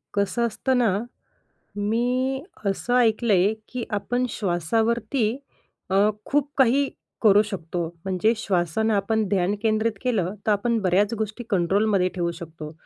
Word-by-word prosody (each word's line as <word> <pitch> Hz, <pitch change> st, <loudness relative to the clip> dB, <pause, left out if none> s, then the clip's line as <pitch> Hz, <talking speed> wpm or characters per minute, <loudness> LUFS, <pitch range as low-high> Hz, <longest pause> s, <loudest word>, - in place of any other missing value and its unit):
कसं 200 Hz, +4 st, +1 dB
असतं 255 Hz, +4 st, 0 dB
ना. 220 Hz, -6 st, +2 dB, 0.8 s
मी, 250 Hz, +5 st, 0 dB, 0.2 s
असं 200 Hz, +5 st, 0 dB
ऐकलंय, 220 Hz, -4 st, +3 dB, 0.2 s
की 250 Hz, -1 st, -4 dB, 0.2 s
आपण 245 Hz, +4 st, -1 dB
श्वासावरती 220 Hz, -, 0 dB, 0.5 s
अ, -, -, +2 dB, 0.3 s
खूप 290 Hz, 0 st, 0 dB
काही 270 Hz, +1 st, +4 dB, 0.3 s
करू 210 Hz, -2 st, +6 dB
शकतो. 175 Hz, -4 st, -4 dB, 0.2 s
म्हणजे 190 Hz, +4 st, +2 dB
श्वासानं 205 Hz, +1 st, 0 dB
आपण 215 Hz, +2 st, +1 dB
ध्यान 195 Hz, 0 st, +1 dB
केंद्रित 220 Hz, 0 st, +1 dB
केलं, 205 Hz, -7 st, 0 dB
तर 215 Hz, -, +4 dB
आपण 230 Hz, +3 st, +1 dB
बऱ्याच 200 Hz, +4 st, +2 dB
गोष्टी 220 Hz, +3 st, -3 dB
कंट्रोलमध्ये 195 Hz, +1 st, +2 dB
ठेवू 170 Hz, -1 st, -1 dB
शकतो. 160 Hz, -2 st, -8 dB
215 Hz, 125 wpm, -24 LUFS, 190-235 Hz, 0.8 s, करू